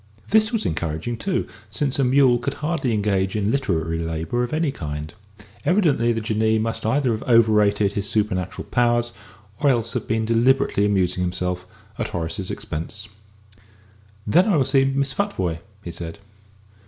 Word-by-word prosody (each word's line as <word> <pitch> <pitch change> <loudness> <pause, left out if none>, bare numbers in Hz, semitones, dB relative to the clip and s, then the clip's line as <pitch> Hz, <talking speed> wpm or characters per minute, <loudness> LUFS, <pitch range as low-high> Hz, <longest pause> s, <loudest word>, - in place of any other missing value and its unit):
This 215 +1 +4
was 225 -3 0
encouraging, 85 +8 -2
too, 185 - -1 0.2
since 135 +6 -1
a - - +4
mule 130 -1 +4
could 140 +4 -3
hardly 150 -3 -1
engage 100 -3 0
in 105 0 +1
literary 80 - 0
labour 80 +8 -2
of 120 - -3
any 155 -2 0
kind. 75 - -6 0.5
Evidently 155 - +3
the 115 - 0
Jinnee 110 0 +1
must 110 0 -2
either 130 +1 +2
have 110 - -2
overrated 105 -3 +4
his 100 0 -2
supernatural 95 -4 -1
powers, 120 -1 +2 0.5
or 145 - +3
else 115 -3 +1
have - - -3
been 110 0 0
deliberately 115 -2 +3
amusing 90 -3 +1
himself 90 0 -2 0.3
at - - -1
Horace's 85 +2 -3
expense. 100 +6 -6 1.2
"Then 175 - +4
I 200 - +3
will 140 -4 +3
see 135 +1 +3
Miss 135 0 0
Futvoye," 95 - -1 0.2
he 85 - -6
said. 85 -1 -6
110 Hz, 155 wpm, -22 LUFS, 95-135 Hz, 1.2 s, This